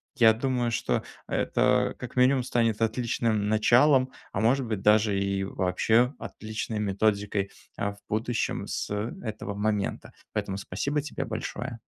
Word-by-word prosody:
Я 115 -4 +6
думаю, 125 0 0
что - - 0 0.2
это - - +2
как - - -7
минимум 130 +1 +4
станет 115 -3 0
отличным 115 -2 0
началом, 130 +5 +4 0.2
а 100 - -2
может 125 +3 +3
быть, 110 -4 -3
даже 105 -1 +4
и 100 0 0
вообще 110 +7 +2
отличной 110 0 -5
методикой, 100 -1 0 0.3
а, 100 - -1
в - - -19
будущем 110 +2 -1
с - - -3 0.3
этого 110 -2 -4
момента. 105 0 -2 0.2
Поэтому 95 0 -2
спасибо 140 +10 -2
тебе 140 -2 -4
большое. 115 +2 -5
110 Hz, 135 wpm, -27 LUFS, 105-120 Hz, 0.3 s, Я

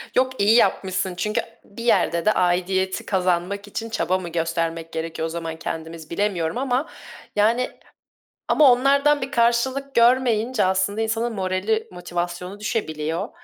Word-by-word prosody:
Yok 260 +1 +3
iyi 215 +3 +5
yapmışsın. 190 -5 +1
Çünkü 210 +5 -1 0.2
bir 220 +3 -10
yerde 170 -7 +2
de 215 - +5
aidiyeti 185 +1 0
kazanmak 185 +1 0
için 225 +2 -5
çaba 185 -4 0
mı 175 -2 -6
göstermek 165 0 -2
gerekiyor 160 0 -3
o - - -2
zaman 165 -1 -5
kendimiz 160 -1 -6
bilemiyorum 180 0 -1
ama. 265 +3 0 0.5
Yani 230 +4 +2 0.8
ama 290 -4 +6
onlardan 280 +3 +3
bir 270 +2 -4
karşılık 260 +3 +1
görmeyince 235 -2 +3
aslında 190 +3 0
insanın 225 +1 -1
morali, 195 +3 -1
motivasyonu 175 +2 -5
düşebiliyor 165 -7 -2
200 Hz, 135 wpm, -23 LUFS, 175-235 Hz, 0.8 s, ama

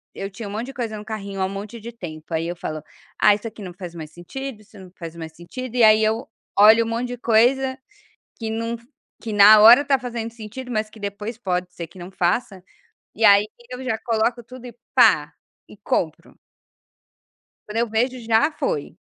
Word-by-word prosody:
eu 195 0 -5
tinha 205 +2 -8
um - - -7
monte 225 +4 -4
de 270 - -8
coisa 230 -4 -3
no 210 - -8
carrinho 200 -3 -5
há - - +2
um - - -3
monte 205 +4 -7
de 235 +2 -7
tempo, 165 -7 -9
aí 165 +1 -1
eu 175 - -4
falo: 155 -2 -6 0.4
"Ah, 205 - +6
isso 215 +2 -7
aqui 215 -2 -10
não 180 -2 -7
faz 175 -2 -9
mais 155 -2 -8
sentido, 230 +6 -8
isso 215 0 -18
não 185 -1 -13
faz 165 -1 -8
mais 160 -1 -8
sentido", 250 +8 -8
e 245 - +2
aí 215 0 +6
eu 220 +3 0 0.3
olho 220 +3 +7
um - - -4
monte 235 +2 -2
de 245 - -5
coisa, 260 +4 +2 0.6
que 225 -2 -4
num 230 +1 -2
f 235 0 -11 0.4
que 225 -3 -5
na 210 +1 +8
hora 240 +6 +9
tá 275 -2 +2
fazendo 235 -2 -5
sentido, 235 +3 -9
mas 215 0 -1
que 220 - -15
depois 205 +3 -5
pode 180 -4 -2
ser 170 - -6
que 170 +3 -17
não 175 +2 -9
faça, 185 +1 -1 0.5
e 220 +1 +2
aí 200 +1 +7 0.3
eu 250 +1 -6
já 225 -4 -1
coloco 235 +1 -1
tudo 250 +2 -12
e 235 - -11 0.2
pá, - - +5 0.3
e - - -14
compro. - - -3 1.3
Quando 210 +2 -5
eu 235 -1 0
vejo, 245 +3 0
já 230 +7 +2
foi. 485 +7 -3
220 Hz, 215 wpm, -22 LUFS, 195-235 Hz, 1.3 s, hora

